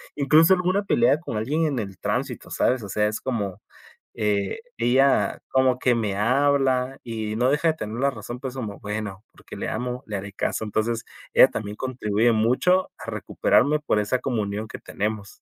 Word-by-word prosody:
incluso 155 Hz, +5 st, +5 dB
alguna 185 Hz, +2 st, +1 dB
pelea 130 Hz, -5 st, +3 dB
con 155 Hz, -9 st, -6 dB
alguien 145 Hz, +10 st, 0 dB
en 140 Hz, -5 st, -1 dB
el 100 Hz, -3 st, -6 dB
tránsito, -, -, -3 dB
sabes, 125 Hz, -2 st, +1 dB
o 100 Hz, -, -7 dB
sea, 105 Hz, +2 st, +1 dB
es 110 Hz, -, -4 dB
como, 105 Hz, -6 st, -3 dB, 0.5 s
eh, 105 Hz, -, -1 dB, 0.2 s
ella 130 Hz, +3 st, +3 dB
como 130 Hz, -1 st, +2 dB
que 125 Hz, -2 st, +3 dB
me 105 Hz, -4 st, -1 dB
habla 135 Hz, +2 st, +2 dB
y 110 Hz, -2 st, -4 dB
no 125 Hz, +2 st, +3 dB
deja 150 Hz, +3 st, +2 dB
de 160 Hz, -, +2 dB
tener 110 Hz, -5 st, -5 dB
la 140 Hz, +1 st, +3 dB
razón, 120 Hz, +2 st, -7 dB
pues, 130 Hz, -1 st, -6 dB
como 110 Hz, -6 st, -5 dB
bueno, 105 Hz, -1 st, -5 dB
porque -, -, -12 dB
le -, -, -3 dB
amo, 125 Hz, +2 st, -3 dB
le 105 Hz, -2 st, -3 dB
haré 100 Hz, +1 st, -7 dB
caso. 110 Hz, -, -2 dB
Entonces, 110 Hz, +2 st, -1 dB, 0.3 s
ella -, -, +8 dB
también 105 Hz, 0 st, -5 dB
contribuye 120 Hz, -3 st, +1 dB
mucho 130 Hz, +12 st, +2 dB
a -, -, -8 dB
recuperarme 150 Hz, +3 st, +2 dB
por 125 Hz, -8 st, 0 dB
esa 105 Hz, +5 st, 0 dB
comunión 110 Hz, -4 st, -2 dB
que -, -, -8 dB
tenemos. 105 Hz, -1 st, -4 dB
120 Hz, 185 wpm, -24 LUFS, 105-135 Hz, 0.5 s, ella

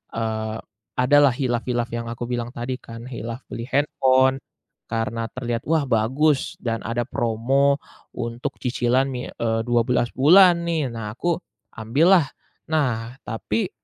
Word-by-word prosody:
eee, 110 Hz, -1 st, -2 dB, 0.4 s
adalah 135 Hz, 0 st, +5 dB
khilaf 120 Hz, -3 st, -1 dB
khilaf 120 Hz, -1 st, -1 dB
yang 115 Hz, 0 st, -4 dB
aku 115 Hz, +1 st, -5 dB
bilang 120 Hz, 0 st, -4 dB
tadi 125 Hz, +2 st, -4 dB
kan. 115 Hz, 0 st, -10 dB
Khilaf 120 Hz, 0 st, -6 dB
beli 115 Hz, +1 st, -5 dB
handphone 130 Hz, -1 st, +3 dB, 0.5 s
karena 115 Hz, 0 st, -2 dB
terlihat, 120 Hz, 0 st, -4 dB
“Wah 160 Hz, -2 st, +2 dB
bagus,” 130 Hz, +4 st, +1 dB
dan 115 Hz, -2 st, -1 dB
ada 120 Hz, +1 st, -1 dB
promo 135 Hz, +6 st, +1 dB, 0.3 s
untuk 120 Hz, 0 st, -4 dB
cicilan 130 Hz, +2 st, +1 dB
mi 125 Hz, -1 st, -4 dB
eee, 115 Hz, -1 st, -1 dB
12 120 Hz, 0 st, +2 dB
bulan 170 Hz, +5 st, +6 dB
nih. 165 Hz, -5 st, 0 dB
Nah, 115 Hz, -3 st, -5 dB
aku 170 Hz, +6 st, 0 dB, 0.4 s
ambillah. 150 Hz, -, +4 dB, 0.5 s
Nah, 120 Hz, -7 st, 0 dB
tapi 185 Hz, -, -2 dB
120 Hz, 135 wpm, -23 LUFS, 115-135 Hz, 0.5 s, bulan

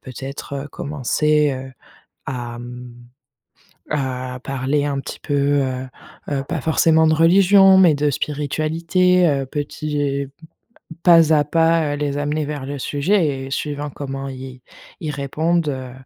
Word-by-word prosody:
peut-être, 135 Hz, +2 st, -8 dB
heu, -, -, -10 dB
commencer, 150 Hz, +1 st, 0 dB
heu, 130 Hz, 0 st, -7 dB, 0.5 s
à, 120 Hz, -2 st, -5 dB
mmh 125 Hz, 0 st, -9 dB, 1.0 s
à 130 Hz, -2 st, -3 dB
parler 135 Hz, +2 st, -1 dB
un 140 Hz, -1 st, -1 dB
petit -, -, -8 dB
peu, 145 Hz, -, -4 dB, 0.3 s
heu 130 Hz, 0 st, -3 dB, 0.4 s
heu, 135 Hz, -1 st, -1 dB
pas 165 Hz, -2 st, -3 dB
forcément 160 Hz, +1 st, +3 dB
de 155 Hz, -, +3 dB
religion, 190 Hz, +4 st, +6 dB
mais 175 Hz, -5 st, +6 dB
de 145 Hz, +1 st, +1 dB
spiritualité, 160 Hz, +6 st, +1 dB
heu, 140 Hz, -2 st, 0 dB
petit 145 Hz, -1 st, -3 dB, 0.8 s
pas 165 Hz, -3 st, +6 dB
à 150 Hz, -1 st, +4 dB
pas, 165 Hz, -1 st, +2 dB
heu, -, -, -6 dB
les 145 Hz, -1 st, -2 dB
amener 150 Hz, +1 st, -1 dB
vers 145 Hz, -2 st, -5 dB
le 145 Hz, 0 st, -4 dB
sujet 145 Hz, -2 st, 0 dB
et -, -, -8 dB
suivant 145 Hz, 0 st, -3 dB
comment 135 Hz, 0 st, -6 dB
ils 130 Hz, -1 st, -9 dB, 0.4 s
ils 155 Hz, -, -3 dB
répondent, 155 Hz, +4 st, -1 dB
heu 130 Hz, -2 st, -5 dB
145 Hz, 140 wpm, -20 LUFS, 135-160 Hz, 1.0 s, religion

